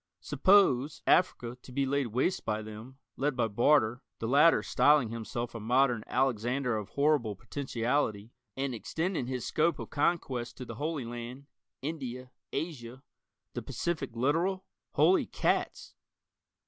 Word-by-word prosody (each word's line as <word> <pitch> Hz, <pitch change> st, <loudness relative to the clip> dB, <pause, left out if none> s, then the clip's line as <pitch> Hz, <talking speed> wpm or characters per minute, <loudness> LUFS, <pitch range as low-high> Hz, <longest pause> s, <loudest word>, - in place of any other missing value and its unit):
Suppose, 150 Hz, -8 st, +3 dB
Africa, 125 Hz, -9 st, +2 dB
to 130 Hz, -, -13 dB
be 135 Hz, +2 st, 0 dB
laid 140 Hz, -1 st, 0 dB
waste 130 Hz, -, 0 dB
by 110 Hz, 0 st, -2 dB
them, 110 Hz, +5 st, -10 dB, 0.2 s
led 140 Hz, 0 st, 0 dB
by 120 Hz, -2 st, +1 dB
Barter, 120 Hz, +2 st, +3 dB, 0.2 s
the 115 Hz, -, -4 dB
latter 145 Hz, +7 st, +5 dB
styling 145 Hz, -5 st, +4 dB
himself 115 Hz, +1 st, -4 dB
a 115 Hz, -, -5 dB
modern 125 Hz, +1 st, +2 dB
Alexander 125 Hz, 0 st, 0 dB
of 105 Hz, -2 st, -4 dB
horrible 140 Hz, -7 st, +1 dB
potentiality, 115 Hz, -2 st, -2 dB, 0.3 s
and 135 Hz, -1 st, -1 dB
extending 160 Hz, -, -2 dB
his 130 Hz, -2 st, -3 dB
scope 160 Hz, 0 st, +1 dB
of -, -, -8 dB
conquest 140 Hz, -6 st, -1 dB
to 125 Hz, -, -6 dB
the -, -, -7 dB
Holy 155 Hz, -4 st, -2 dB
Land, 120 Hz, +3 st, -7 dB, 0.4 s
India, 130 Hz, -4 st, -5 dB, 0.2 s
Asia 130 Hz, -5 st, -5 dB, 0.5 s
the -, -, -4 dB
Pacific 145 Hz, -8 st, -3 dB
littoral? 165 Hz, +10 st, 0 dB, 0.3 s
Holy 370 Hz, -, +4 dB
cats! -, -, -1 dB
130 Hz, 135 wpm, -30 LUFS, 120-145 Hz, 0.5 s, latter